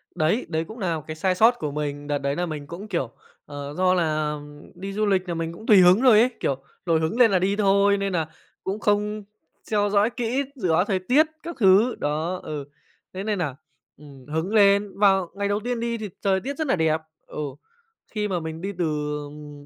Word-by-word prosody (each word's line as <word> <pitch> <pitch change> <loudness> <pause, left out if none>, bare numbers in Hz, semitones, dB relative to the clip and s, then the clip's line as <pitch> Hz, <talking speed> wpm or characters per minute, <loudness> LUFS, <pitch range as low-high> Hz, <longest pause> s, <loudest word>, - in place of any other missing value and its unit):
Đấy, 165 +11 +1
đấy 160 0 -1
cũng 220 +8 -11
nà 175 -5 -1
một 150 - -8
cái 155 - -5
sai 185 +3 0
sót 225 +5 +6
của 150 -2 -3
mình. 145 0 -4
Đợt 145 - 0
đấy 140 0 -2
nà 180 - -1
mình 150 -4 -6
cũng, 180 +7 -8
kiểu, 170 - -2 0.3
ờ, 145 0 -7
do 185 0 +3
là 155 -3 0 0.4
đi 195 +1 -6
du 215 +1 0
lịch 190 -2 +1
là 170 - -1
mình 165 0 -3
cũng 220 - -12
tùy 210 - +7
hứng 185 +3 +6
thôi 245 -5 +7
ấy, 245 - +5
kiểu, 135 - 0 0.3
nổi 165 -2 +2
hứng 160 +10 -2
lên 230 -3 +6
là 190 - +3
đi 195 +3 +1
thôi 200 0 +3
nên 195 -1 -2
nà 165 -3 0 0.4
cũng 195 +3 -3
không 210 0 0 0.4
theo 205 -1 0
dõi 205 +2 +3
kỹ 245 +2 -1
dự 190 -10 -2
báo 175 +4 +3
thời 195 -3 0
tiết 255 +12 +4 0.2
các 340 +1 -6
thứ, 205 +4 +5
đó, 155 +5 -1
ừ, 145 -2 -5 0.5
thế 190 +1 -5
nên 210 -2 -1
nà, 150 -7 -2 0.4
ừm, 140 -3 -14
hứng 160 +7 -2
lên 200 -1 +4
vào 195 -3 +4
ngày 200 0 -1
đầu 205 +1 0
tiên 240 +2 -3
đi 235 0 -2
thì 215 -2 -5
trời 190 -1 +2
tiết 275 +7 -5
rất 315 -1 -2
là 260 - +3
đẹp, 160 -2 +1 0.3
ừ, - - -8 0.7
khi 210 -1 -1
mà 185 -3 -1
mình 160 0 -6
đi 195 - -3
từ, 175 - 0 0.4
ừm, 145 -1 -11
190 Hz, 230 wpm, -24 LUFS, 160-210 Hz, 0.7 s, tùy